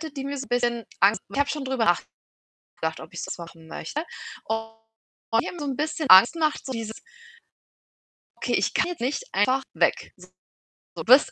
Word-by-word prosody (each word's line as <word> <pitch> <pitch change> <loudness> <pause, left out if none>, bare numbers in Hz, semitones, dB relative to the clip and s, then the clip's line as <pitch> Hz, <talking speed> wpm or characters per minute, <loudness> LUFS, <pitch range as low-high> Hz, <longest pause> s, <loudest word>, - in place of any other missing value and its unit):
die 270 -1 -4
mir 280 0 -3
so 270 - -5
'n - - -20
bisschen 240 -2 0
Angst 200 +3 +4
macht. - - -9
Ich - - 0
habe 285 0 +2
schon 295 -3 -3
drüber 260 -3 0 0.7
nachgedacht, 160 0 -5
ob 160 +3 -11
ich's 175 - -5
jetzt - - -5
machen 165 -1 -11
möchte. 285 - -4 0.4
Und 225 0 -3 0.7
die - - -6
haben 350 - -7
so 295 - -4
'n 270 -2 -2
bisschen 305 0 -2
Angst 190 +5 +10
gemacht, 310 -2 0
so 265 - -3
dieses 225 -2 -5 1.4
okay, - - -2
ich - - +1
gehe 355 -1 +1
nicht 265 - -1
einfach 265 +1 +2
weg. - - +1
So, 180 0 -15 0.7
du - - -5
bist 260 +2 +6
250 Hz, 190 wpm, -25 LUFS, 220-285 Hz, 1.4 s, Angst